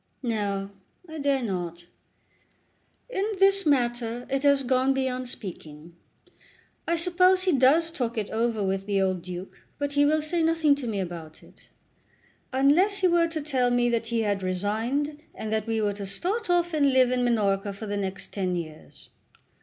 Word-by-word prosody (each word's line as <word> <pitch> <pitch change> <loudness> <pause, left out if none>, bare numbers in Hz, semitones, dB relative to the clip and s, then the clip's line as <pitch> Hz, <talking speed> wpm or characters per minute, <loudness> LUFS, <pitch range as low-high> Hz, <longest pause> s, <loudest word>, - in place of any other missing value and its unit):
"No; 200 -4 -2 0.4
I 315 -1 -8
dare 280 -2 +1
not. 175 -5 -4 1.2
In 395 -6 -2
this 390 -2 +4
matter 240 -3 0
it 270 0 0
has 280 -1 +3
gone 260 +1 +2
beyond 255 -1 -2
speaking. 170 -7 -9 0.9
I 340 - +2
suppose 365 +2 +3
he 375 - +2
does 300 +4 +4
talk 245 -7 -3
it 210 -2 -2
over 225 -1 0
with 195 +1 -2
the 200 -1 +1
old 185 -2 0
Duke; 180 +1 -8 0.2
but 285 0 -2
he 285 0 +4
will 305 +1 +2
say 335 +2 -1
nothing 325 -2 +3
to 265 -4 -5
me 210 -3 -2
about 170 -4 -7
it, - - -20 0.8
unless 295 +10 +3
he 370 - +5
were 340 -1 +3
to 325 -2 -4
tell 265 -4 +1
me 245 0 +2
that 230 -1 -1
he 230 -1 0
had 205 -2 0
resigned, 225 +11 -2
and 220 - -5
that 220 0 -1
we 225 -1 0
were 205 -1 0
to 200 -1 -7
start 365 - -3
off 345 -1 +2
and 285 -3 +3
live 255 -1 +4
in 250 -1 +1
Minorca 205 -4 +1
for 200 +3 -8
the 205 -1 -3
next 195 -1 -4
ten 185 -3 -1
years. 155 -3 -8
245 Hz, 175 wpm, -26 LUFS, 200-295 Hz, 1.2 s, he